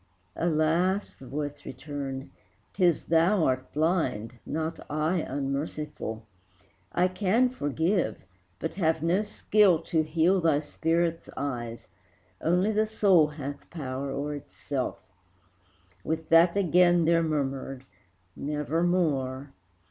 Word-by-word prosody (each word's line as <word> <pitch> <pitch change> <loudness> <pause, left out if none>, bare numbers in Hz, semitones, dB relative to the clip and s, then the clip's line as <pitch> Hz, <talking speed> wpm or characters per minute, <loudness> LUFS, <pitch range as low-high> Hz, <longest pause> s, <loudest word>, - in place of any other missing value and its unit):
"Alas!" 170 +4 +1
the 130 - -14
voice 145 +1 -4
returned, 135 0 -6 0.4
"'t 185 - -1
is 175 -3 +3
thou 170 +3 +3
art 130 0 -1
blind, 150 - 0
Not 160 +1 -3
I 155 +4 0
unmerciful; 140 -5 -4 0.7
I 180 +1 +3
can 205 +7 +2
forgive, 160 - 0 0.4
But 160 - -4
have 160 -1 +2
no 175 +4 +2
skill 210 -3 +3
to 160 -1 +1
heal 165 +4 +2
thy 155 -3 +3
spirit's 165 +2 -1
eyes; 120 -4 -4 0.5
Only 180 +6 +2
the 215 0 +1
soul 195 -7 +4
hath 145 -1 -7
power 140 -4 -4
o'er 140 +2 -3
itself." 140 -2 -4 1.1
With 160 0 -3
that 170 +3 +6
again 175 -2 +4
there 165 +1 +4
murmured 135 -4 -2 0.5
"Nevermore!" 150 -3 -1
160 Hz, 110 wpm, -28 LUFS, 140-175 Hz, 1.1 s, that